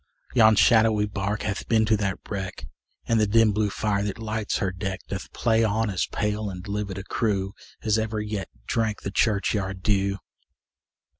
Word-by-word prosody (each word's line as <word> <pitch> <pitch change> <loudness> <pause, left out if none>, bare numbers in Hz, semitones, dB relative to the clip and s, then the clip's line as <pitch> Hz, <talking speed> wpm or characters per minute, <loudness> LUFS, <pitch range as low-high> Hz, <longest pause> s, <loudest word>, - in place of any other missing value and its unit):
Yon 110 -3 +6
shadowy 110 0 +5
bark 100 +1 -2
hath 105 -1 -3
been 110 -1 +3
to 110 0 +3
that 100 -3 -1
wreck, 95 -2 -5 0.4
And 115 -1 +2
the 105 - +3
dim 110 +1 +4
blue 105 0 +1
fire, 100 0 0
that 105 +1 -3
lights 110 -1 -2
her 95 - -1
deck, 95 0 -4
Doth 95 0 -6
play 115 -1 +2
on 110 0 +1
as 90 - 0
pale 105 -1 -2
and 90 0 -8
livid 100 -2 -3
a 95 - -5
crew, 100 -2 -1 0.3
As 110 0 +2
ever 110 0 -2
yet 105 -2 -4 0.2
drank 110 - -1
the 100 - -3
churchyard 100 -3 0
dew. 100 -1 +1
105 Hz, 175 wpm, -25 LUFS, 100-110 Hz, 0.4 s, Yon